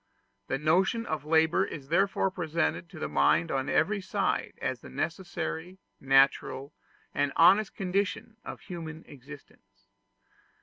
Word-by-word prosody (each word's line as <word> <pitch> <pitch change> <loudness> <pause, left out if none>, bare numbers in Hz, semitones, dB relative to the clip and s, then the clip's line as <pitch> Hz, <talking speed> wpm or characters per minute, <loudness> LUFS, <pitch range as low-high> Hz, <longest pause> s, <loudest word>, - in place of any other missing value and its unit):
The 135 - -1
notion 185 +10 +2
of 155 - -4
labor 160 +3 +3
is 140 -7 -7
therefore 195 +2 +2
presented 170 0 -2
to 180 - -12
the - - -3
mind 170 -1 +2
on 135 +1 -1
every 205 -1 +1
side - - -1
as - - -2
the - - -11
necessary, 170 - -4 0.2
natural, 135 +1 +2 0.4
and 145 0 0
honest 195 +5 +5
condition 195 +3 -2
of - - -8
human 160 -3 -8
existence. 125 -8 -15
160 Hz, 130 wpm, -29 LUFS, 145-185 Hz, 0.4 s, honest